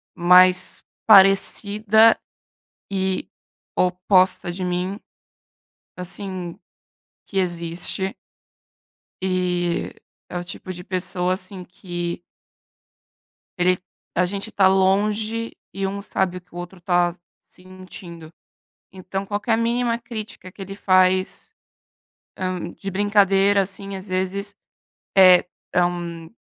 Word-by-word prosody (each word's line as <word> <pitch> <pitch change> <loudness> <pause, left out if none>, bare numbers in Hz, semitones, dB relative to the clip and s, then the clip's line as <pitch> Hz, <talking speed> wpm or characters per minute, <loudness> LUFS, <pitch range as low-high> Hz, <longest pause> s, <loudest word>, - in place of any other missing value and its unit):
mais 180 +1 +5 0.2
parecida 205 +2 +5 0.7
e 190 -1 -1 0.5
oposta 185 0 +2
de 185 +1 -4
mim, 180 +2 -2 1.0
assim, 180 -1 -5 0.7
que 195 - -6
existe. 175 +2 -1 1.1
E 180 -2 -1 0.4
é 180 - -4
o 175 - -5
tipo 180 +1 -7
de 180 0 -10
pessoa 180 -1 -1
assim 185 0 -5
que 175 -1 -5 1.4
ele 180 +1 +3 0.4
a 180 0 +2
gente 200 +4 -4
tá 190 -1 +5
longe 210 +4 +1 0.2
e 195 - -3
um 200 +1 -4
sabe 190 -2 -1
o - - -14
que 180 -1 -26
o - - -7
outro 175 +1 -8
tá 175 -1 +1 0.3
sentindo. 180 -3 -11 0.6
Então, 190 +1 -5
qualquer 210 +3 0
mínima 235 0 0
crítica 215 -5 -8
que 195 - -13
ele 195 +1 -7
faz, 185 -1 +2 0.9
hã, 185 -2 -3
de 195 - -7
brincadeira, 200 0 +3
assim, 195 +1 -5
às 190 +1 -9
vezes, 190 +2 -2 0.6
é 185 -2 +8 0.3
é, 180 - +5
hum, 170 -2 -5
185 Hz, 105 wpm, -22 LUFS, 180-195 Hz, 1.4 s, é